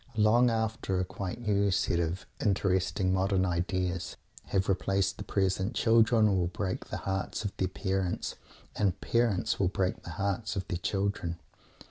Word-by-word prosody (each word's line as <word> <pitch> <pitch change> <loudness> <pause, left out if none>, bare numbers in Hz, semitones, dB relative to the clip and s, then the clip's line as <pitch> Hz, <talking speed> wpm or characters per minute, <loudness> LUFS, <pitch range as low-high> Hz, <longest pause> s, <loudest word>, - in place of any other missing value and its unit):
Long 115 +4 +5
after 110 -4 -1
a 90 - 0
quite 95 +4 -5
new 100 -3 +2
set 95 -2 +1
of 85 +2 -2 0.2
"interesting 95 -2 +1
modern 95 0 +2
ideas" 90 0 -1 0.3
have 95 0 0
replaced 100 0 +1
the - - -4
present, 95 +2 0
children 115 -2 +4
will 90 -2 +1
break 95 0 -3
the - - -4
hearts 95 +2 -2
of 100 - -3
their 95 - +1
parents, 95 -1 -2 0.4
and 100 -2 +1
parents 115 -1 +1
will 95 - +3
break 95 0 -1
the - - -9
hearts 100 +2 -1
of 95 -1 -3
their 85 - -2
children. 95 -4 -1
95 Hz, 155 wpm, -30 LUFS, 95-105 Hz, 0.4 s, Long